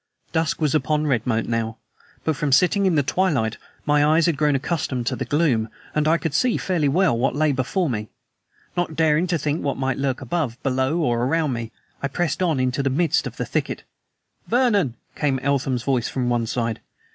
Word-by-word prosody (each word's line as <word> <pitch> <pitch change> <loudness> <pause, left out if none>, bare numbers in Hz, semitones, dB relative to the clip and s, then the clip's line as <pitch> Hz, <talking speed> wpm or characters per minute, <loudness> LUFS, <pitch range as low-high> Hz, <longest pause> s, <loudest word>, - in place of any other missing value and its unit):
Dusk 160 -3 0
was 150 -4 +1
upon 155 0 +1
Redmoat 120 -4 0
now, 115 -1 -2 0.5
but 160 - 0
from 145 0 -1
sitting 190 +7 +4
in 180 - +2
the 145 - +3
twilight 140 - 0 0.3
my 150 0 +3
eyes 155 +2 +4
had 170 - +2
grown 150 0 +2
accustomed 135 -4 -2
to - - 0
gloom, 140 -8 +1 0.2
and 150 0 +1
I 165 +2 +4
could 165 -3 -3
see 250 +9 +2
fairly 165 -7 0
well 175 -2 +3
what 130 +4 0
lay 155 0 +2
before 140 +8 0
me. 105 -5 -3 0.7
Not 175 -3 -1
daring 160 +2 +3
to 175 -1 +1
think 150 +2 -1
what 140 - -1
might 135 -1 -1
lurk 135 -2 -1
above, 130 -3 -2
below, 135 +5 +1
around 135 +5 +1
me, 115 -1 -5 0.3
I 140 - 0
pressed 175 +2 -1
on 165 -7 +1
into 130 +1 0
the 135 - +1
midst 160 +3 +1
of - - -9
the - - -2
thicket. - - -2 0.6
"Vernon!" 210 - +2 0.2
came 140 -3 +1
Eltham's 130 -2 0
voice 130 -4 0
from 125 -2 -1
one 120 -2 0
side. 115 -1 -2
145 Hz, 190 wpm, -23 LUFS, 130-160 Hz, 0.7 s, sitting